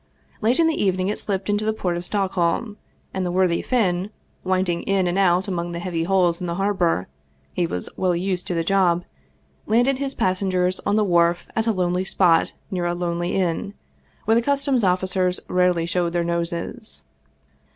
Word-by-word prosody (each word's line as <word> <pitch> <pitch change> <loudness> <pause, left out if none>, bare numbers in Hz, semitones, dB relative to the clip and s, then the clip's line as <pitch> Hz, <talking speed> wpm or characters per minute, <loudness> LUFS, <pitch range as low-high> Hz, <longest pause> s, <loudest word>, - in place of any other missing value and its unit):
Late 235 +6 +2
in 330 - +5
the 320 -6 +1
evening 185 -1 +1
it 210 - -2
slipped 195 -2 -2
into 205 0 0
the 220 0 +1
port 180 -5 -2
of 175 - -4
Stockholm, 195 +2 -1 0.4
and 190 - -2
the 180 - -1
worthy 180 -2 +2
Finn, 195 -6 0 0.3
winding 185 -2 0
in 195 -2 +1
and 175 0 0
out 190 -1 +3
among 175 -2 -3
the 170 - -4
heavy 170 -2 -2
hulls 180 -2 +2
in 180 - -3
the 170 - -2
harbor 185 - 0 0.5
he 175 - 0
was 90 - -4
well 185 -2 +1
used 185 +1 -2
to 180 - -2
the 165 - 0
job 180 -1 +2 0.6
landed 245 +4 +2
his 275 -1 -3
passengers 185 -1 0
on 205 - +2
the 215 - +3
wharf 170 -2 +2
at 225 0 0
a - - +4
lonely 180 -2 0
spot 180 -3 +2 0.2
near 180 -2 -1
a 175 - -1
lonely 175 0 -2
inn, 190 +2 -1 0.5
where 220 - +3
the 230 - +4
customs 275 -2 +1
officers 185 0 +1
rarely 180 -2 +2
showed 170 0 -1
their 175 -1 +1
noses. 170 - -4
185 Hz, 185 wpm, -22 LUFS, 175-195 Hz, 0.6 s, in